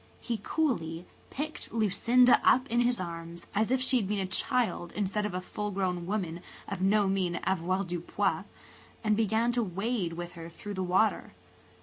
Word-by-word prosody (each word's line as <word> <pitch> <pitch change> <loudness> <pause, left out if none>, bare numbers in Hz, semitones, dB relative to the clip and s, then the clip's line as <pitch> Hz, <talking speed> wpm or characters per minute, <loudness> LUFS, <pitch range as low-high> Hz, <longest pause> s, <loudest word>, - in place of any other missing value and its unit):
He 230 -3 -3
coolly 175 - -1 0.2
picked 305 +3 -5
Lucinda 230 +3 +4
up 255 +1 +5
in 240 +1 +3
his 240 0 +1
arms, 170 -1 -6
as 215 +2 +1
if 260 0 +2
she 260 0 +4
had 210 -5 0
been 205 +1 -1
a 195 - 0
child 215 -2 +1
instead 210 +1 -1
of 190 - -6
a 185 - -2
full 210 +3 -4
grown 185 -3 -2
woman 180 -4 -2 0.3
of 195 -2 -4
no 200 +1 +3
mean 185 -3 0
avoirdupois, 180 -1 -1 0.6
and 215 -1 +3
began 225 +2 +2
to 240 0 +1
wade 195 -2 -2
with 175 +1 -6
her 165 -1 -8
through 205 +5 -8
the 190 - -3
water. 190 +4 +1
195 Hz, 175 wpm, -30 LUFS, 180-230 Hz, 0.6 s, up